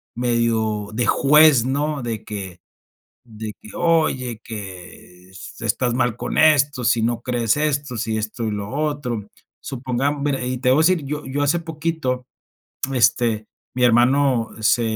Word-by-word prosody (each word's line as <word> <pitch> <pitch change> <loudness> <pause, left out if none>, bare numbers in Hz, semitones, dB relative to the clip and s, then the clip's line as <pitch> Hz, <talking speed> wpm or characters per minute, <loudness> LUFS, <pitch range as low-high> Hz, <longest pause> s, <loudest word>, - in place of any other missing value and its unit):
medio 115 -3 0
de 120 +2 0
juez, 150 -3 +5
¿no? 145 +1 -1
De 115 -2 -4
que 95 -4 -7 0.7
de 110 -2 -7
que: - - -12
"Oye, 145 -9 +1
que 90 -3 -10 0.3
estás 120 +2 0
mal 120 -2 +1
con - - -4
esto, 145 -4 +4
si 115 -1 +2
no 115 +1 0
crees 120 -1 0
esto, 145 -4 -1
si 110 0 -2
esto 110 +2 -4
y 110 - -1
lo 100 -1 -4
otro". 140 -7 -3 0.3
Supongamos 135 +2 -2
mira, 135 -3 -1
y 130 0 -2
te 125 +1 0
voy 135 - +4
a - - +5
decir, 165 -2 +2
yo 150 +2 -4
yo 135 +2 -2
hace 145 +4 +2
poquito, 160 -6 -3 0.7
este, 115 -3 +2 0.3
mi 125 0 +1
hermano 125 0 +3
se 110 +3 +3
125 Hz, 150 wpm, -21 LUFS, 110-145 Hz, 0.7 s, juez